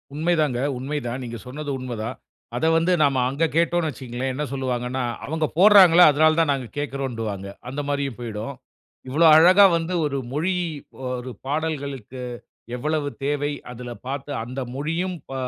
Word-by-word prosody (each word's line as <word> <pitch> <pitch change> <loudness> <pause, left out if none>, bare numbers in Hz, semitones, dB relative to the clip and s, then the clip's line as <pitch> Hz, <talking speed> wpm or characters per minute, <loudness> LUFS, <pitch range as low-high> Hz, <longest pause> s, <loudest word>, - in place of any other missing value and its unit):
உண்மைதாங்க, 155 -5 +1 0.2
உண்மைதான். 130 -1 -4
நீங்க 120 -1 -6
சொன்னது 145 +3 -6
உண்மதான். 120 -1 -5 0.4
அத 125 - 0
வந்து 165 +3 +2
நம்ம 135 -3 +2
அங்க 140 +5 -2
கேட்டோன்னு 170 0 +2
வச்சிக்கோங்களேன். 130 -1 -4
என்ன 145 +4 -3
சொல்லுவாங்கன்னா, 130 -1 -2 0.2
"அவங்க 160 +1 -1
போட்றாங்களா 185 -3 +8
அதனால 155 +2 +4
தான் 160 -3 +3
நாங்க 135 -3 -2
கேட்கிறோம்"ன்டுவாங்க 120 -8 -3 0.2
அந்த 140 +3 -3
மாரியும் 140 -4 -2
போயிடும். 115 +2 -5 0.5
இவ்வளோ 150 +6 +3
அழகா 185 +5 +8
வந்து 165 +2 -3
ஒரு 140 -2 -1 0.2
மொழி, 165 +6 0 0.6
ஒரு 125 +1 -6 0.2
பாடல்களுக்கு 140 -5 -3 0.5
எவ்வளவு 150 +3 -1 0.2
தேவை? 145 0 0 0.2
அதுல 125 0 -8 0.2
பார்த்து 140 +1 -4
அந்த 130 +3 -5
மொழியும், 165 +6 -2
ப - - -6
140 Hz, 140 wpm, -23 LUFS, 125-160 Hz, 0.6 s, போட்றாங்களா